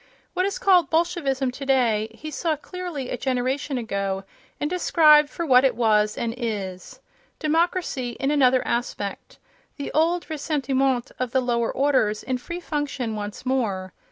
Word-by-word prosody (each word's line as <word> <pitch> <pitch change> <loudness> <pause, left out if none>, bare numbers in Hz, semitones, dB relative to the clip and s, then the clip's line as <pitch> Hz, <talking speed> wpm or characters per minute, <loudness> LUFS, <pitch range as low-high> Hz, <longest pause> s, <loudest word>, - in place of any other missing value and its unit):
What 370 +1 +1
is 400 - -3
called 380 -8 +4
Bolshevism 300 -6 0
today 250 -5 +1
he 310 +4 -8
saw 320 0 -1
clearly 320 -4 -6
a - - -2
generation 260 +2 -1
ago 195 -4 -2 0.4
and 295 - 0
described 305 -3 +5
for 340 - -4
what 255 -3 +6
it 260 -4 +3
was 215 -2 +2
and 230 -1 -2
is—democracy 245 - -3
in 275 +1 +1
another 260 -3 +3
aspect, 235 -4 -3 0.4
the 285 - -5
old 335 +3 +1
ressentiment 275 -5 0
of 255 -2 -2
the 260 - +4
lower 235 -2 0
orders 260 -7 +1
in 255 0 -2
free 340 +7 -6
function 285 -8 -3
once 210 +3 -6
more. 200 -9 -1
265 Hz, 145 wpm, -24 LUFS, 235-305 Hz, 0.4 s, what